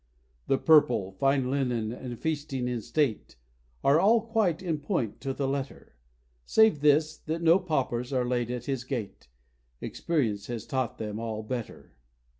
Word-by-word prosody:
The 135 - +3
purple, 125 -11 +4
fine 135 +5 +1
linen, 125 -5 -1
and 120 0 -7
feasting 145 -4 -2
in 120 -2 -2
state, 135 - -1 0.5
Are 140 +3 +5
all 215 +6 +5
quite 215 -6 0
in 165 -4 -1
point 145 - -2
to 135 - -2
the 135 0 -2
letter; 135 - -5 0.5
Save 220 - +4
this, 150 +1 +3
that 165 +2 -4
no 165 +3 +6
paupers 135 -8 -2
are 130 -2 +1
laid 120 -1 -1
at 125 -1 -4
his 135 -3 -2
gate, 120 - -5 0.5
Experience 110 -11 -2
has 120 -3 -5
taught 130 -3 -2
them 105 -1 -4
all 110 -1 -4
better. 120 0 -6
135 Hz, 155 wpm, -28 LUFS, 120-155 Hz, 0.5 s, no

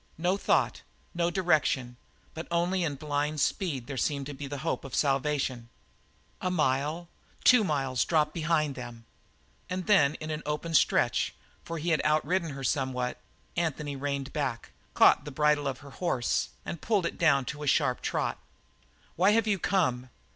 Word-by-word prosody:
No 175 +4 +1
thought, 200 - +1 0.3
no 170 -1 +1
direction; 155 -9 +1 0.4
but 160 - -6
only 175 +2 +1
in 150 -4 -1
blind 150 +1 -2
speed 145 - -1
there 135 0 -6
seemed 140 0 -1
to 145 - -6
be 140 +1 -6
the 145 +1 -5
hope 165 - -1
of 135 - -9
a - - -1
salvation. 135 -4 0 0.7
A 185 - 0
mile, 155 +1 0 0.4
two 250 -3 +7
miles 135 - 0
dropped 155 -2 +1
behind 155 -3 +1
them, 120 -3 -9 0.6
and 185 0 -3
then 155 -9 +4
in 155 0 -6
an 155 0 -3
open 150 +2 -3
stretch, - - +2 0.3
for 165 - -5
he 165 +3 -2
had 155 - +2
outridden 155 +2 +1
her 135 0 -7
somewhat, 125 -1 -1 0.4
Anthony 150 -4 -2
reined 140 0 -3
back, 135 -7 -3 0.2
caught - - +6
the - - -7
bridle 150 0 +2
of 130 -2 -4
her 140 -1 -12
horse, 135 -7 -1 0.2
and 170 - -5
pulled 205 -5 +1
it - - -4
down 140 -6 +4
to 150 +3 -6
a 150 - -4
sharp 125 -2 +2
trot. - - -1 0.8
"Why 190 +5 +5
have 225 0 +3
you 205 -3 +1
come?" 130 -10 0
150 Hz, 170 wpm, -29 LUFS, 135-170 Hz, 0.8 s, two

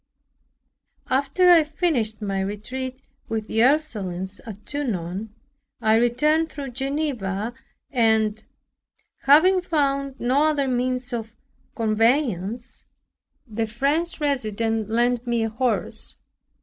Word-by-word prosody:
After 280 +7 +2
I 335 -2 +7
finished 290 -9 -1
my 195 -1 -1
retreat 255 +7 -5 0.3
with 220 -1 -2
the 220 +1 0
Ursulines 205 - 0
at 210 -1 -9
Tonon, 210 - -3 0.5
I 220 -1 +3
returned 300 +8 +2
through 280 -4 -6
Geneva 245 -6 -2 0.4
and, 220 -4 +2 0.8
having 355 +7 +5
found 275 -5 -1
no 265 +5 +2
other 295 -3 +1
means 250 0 -1
of 225 -1 -5 0.4
conveyance, 225 - 0 0.6
the 225 -2 -3
French 285 +10 -1
resident 225 -6 -1
lent 240 +2 +1
me 235 -1 +1
a 225 - 0
horse. 245 +2 -1
245 Hz, 105 wpm, -23 LUFS, 220-280 Hz, 0.8 s, I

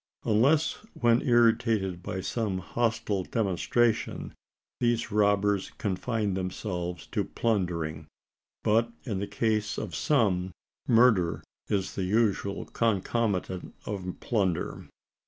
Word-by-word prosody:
Unless 145 - +2 0.2
when 120 -1 +4
irritated 115 -7 +2
by 95 +1 -4
some 105 -1 -1
hostile 105 0 -1
demonstration, 110 +3 0 0.5
these 120 -2 +1
robbers 100 -1 +2
confine 105 +1 -1
themselves 90 -1 -3
to - - 0
plundering: 85 -8 -1 0.6
but 115 +2 +3
in 105 -7 -3
the 100 - -3
case 110 -2 0
of 105 -6 -4
some, 95 - +1 0.3
murder 115 -8 +4 0.2
is 95 -2 -1
the 95 - -2
usual 100 -1 +1
concomitant 100 -4 -1
of 95 -3 -4
plunder. 95 -7 -1
105 Hz, 100 wpm, -28 LUFS, 95-115 Hz, 0.6 s, when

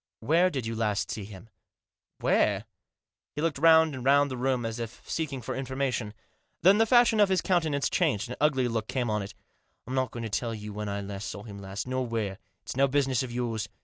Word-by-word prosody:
" - - -66
Where 175 +3 +5
did 135 -8 -3
you 115 0 -3
last 105 -2 -1
see 105 - -5
him? 100 +1 -11 0.3
" - - -65
" - - -59
Where? - - +2 0.3
" - - -66
He 150 - -2
looked 165 -4 0
round 160 0 +6
and 130 -2 -6
round 140 +1 +4
the - - -3
room, 125 -1 0
as 115 +1 -4
if 115 0 -7
seeking 140 -6 -3
for - - -4
information. 130 -4 -2 0.5
Then 195 +4 +6
the 225 - +4
fashion 240 -2 +5
of 205 -2 +5
his 190 -1 +3
countenance 160 -6 +1
changed, 130 - +1
an 125 - -6
ugly 135 -4 +3
look 115 -2 -2
came 125 -4 -1
on 105 0 0
it. 100 +1 -8 0.2
" - - -46
I'm 130 - -6
not 130 -1 +1
going 120 - -6
to - - -2
tell 115 +2 -2
you 105 -1 -7
when 105 0 -4
I 100 0 -4
saw 100 0 -6
him 100 -3 -9
last, 100 +2 -5
nor 130 0 -1
where. 110 -5 -3 0.2
It's - - -6
no 135 +1 +4
business 135 -2 +1
of 130 -2 -4
yours. 120 -3 -2
125 Hz, 240 wpm, -28 LUFS, 110-145 Hz, 0.5 s, round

